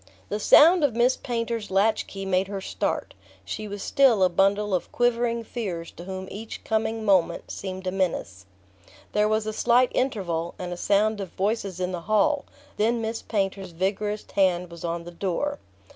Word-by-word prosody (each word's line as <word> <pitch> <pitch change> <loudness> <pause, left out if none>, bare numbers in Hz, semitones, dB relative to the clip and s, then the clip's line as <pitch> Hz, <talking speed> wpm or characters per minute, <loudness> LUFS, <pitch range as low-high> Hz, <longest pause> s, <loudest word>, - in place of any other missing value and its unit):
XXXI 95 0 -28
The 210 - -2
sound 325 - +7
of 265 -6 +2
Miss 245 +2 +3
Painter's 230 -3 -3
latch 205 +3 +2
key 195 -1 -6
made 190 0 +1
her 200 0 -4
start. 190 - -3 0.3
She 215 - -5
was 205 -1 -6
still 250 -8 +4
a 185 - +5
bundle 195 +3 +2
of 180 - -1
quivering 235 -1 +1
fears 190 -8 -5
to 175 - -11
whom 190 0 -6
each 220 +3 -7
coming 220 0 -1
moment 185 -4 +2
seemed 190 -1 -6
a 185 - 0
menace. 130 - -2 0.6
There 210 0 +2
was 215 0 +1
a 215 - -3
slight 245 +3 +3
interval, 180 -10 -1
and 180 -1 -5
a - - -4
sound 205 +3 +1
of 190 - -5
voices 200 -1 -2
in 180 0 -1
the 175 -2 -4
hall; 275 - +2 0.3
then 230 +3 +2
Miss 225 0 -3
Painter's 195 -3 -2
vigorous 205 +4 -2
hand 180 -3 +1
was 170 -1 -10
on 170 0 -2
the 175 - -9
door. 200 +12 -2
200 Hz, 185 wpm, -25 LUFS, 185-225 Hz, 0.6 s, sound